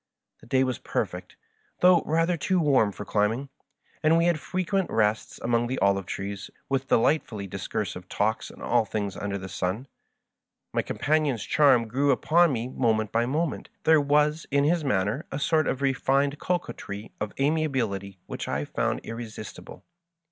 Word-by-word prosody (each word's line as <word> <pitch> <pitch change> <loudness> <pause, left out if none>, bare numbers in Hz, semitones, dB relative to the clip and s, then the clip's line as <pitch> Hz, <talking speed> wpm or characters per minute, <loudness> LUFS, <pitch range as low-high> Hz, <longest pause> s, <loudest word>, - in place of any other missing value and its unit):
The - - -17
day 130 +2 +3
was 130 -1 -2
perfect, - - -4 0.5
though 180 -2 +6
rather 165 +3 +2
too 185 +3 +1
warm 135 -9 +3
for 105 - -8
climbing, 110 +8 0 0.5
and 160 +2 +4
we 165 - +3
had 170 -2 +2
frequent 185 +3 -1
rests 105 -1 0
among 120 0 +1
the 130 +2 -2
olive 100 -1 +2
trees, 100 0 -5 0.2
with 135 -1 -1
de - - +4
lightfully 115 -5 0
discursive 95 -1 -4
talks 110 +2 -1
on - - -12
all 120 -1 +3
things 100 -2 -3
under 100 -1 -3
the 95 0 -7
sun. 95 +7 -3 0.9
My - - +2
companion's 145 -7 0
charm 135 -6 +4
grew 135 +6 +1
upon 165 +5 +4
me 120 -2 -2
moment 110 -4 0
by 115 +1 +1
mo 155 +6 +1
ment. 155 - -6
There 160 -2 +5
was 150 +2 +2
in 140 0 +2
his 165 +2 +2
manner 110 - 0
a - - -2
sort 155 +2 +2
of 135 - -1
refined 140 +2 +1
co 180 - +1
quetry 100 -9 -8
of 105 -1 -2
amiability 130 - 0
which - - -6
I 70 +2 -1
found - - -1
irresistible. 115 -2 -8
130 Hz, 170 wpm, -26 LUFS, 105-150 Hz, 0.9 s, though